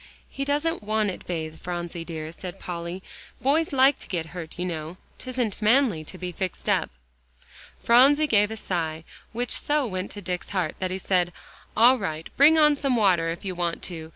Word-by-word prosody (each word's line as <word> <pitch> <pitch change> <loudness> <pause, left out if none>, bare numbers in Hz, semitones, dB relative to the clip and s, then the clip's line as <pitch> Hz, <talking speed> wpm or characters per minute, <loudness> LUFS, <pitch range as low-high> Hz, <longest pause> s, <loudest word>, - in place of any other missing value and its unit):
"He 275 - -3
doesn't 295 +4 0
want 215 -1 0
it - - -10
bathed, 160 -2 -4
Phronsie 175 -1 -4
dear," 160 -2 -6
said 180 +2 -8
Polly. 175 +1 -5 0.4
"Boys 300 +6 +2
like 270 0 +4
to - - -9
get 170 -4 -2
hurt, 170 -2 -7
you 180 - -2
know. 165 0 -5 0.2
'Tisn't 250 -5 -3
manly 215 - +3
to 185 - -10
be 180 0 -5
fixed 185 +1 -5
up." - - +2 0.9
Phronsie 275 +6 +5
gave 210 -7 +3
a 220 - -5
sigh, 160 -5 -3 0.3
which 240 +1 -3
so 295 -1 +1
went 185 -3 -3
to 205 - -7
Dick's 180 0 -4
heart, 180 -6 -1
that 185 - -1
he 185 - -2
said, 180 -2 +1 0.5
"All 245 +3 +6
right, 160 0 -5
bring 305 +4 +7
on 300 -1 +6
some 275 -3 0
water 180 -7 +3
if 170 +4 -5
you 190 - -2
want 175 -1 -2
to. 160 -1 -7
185 Hz, 190 wpm, -25 LUFS, 170-255 Hz, 0.9 s, bring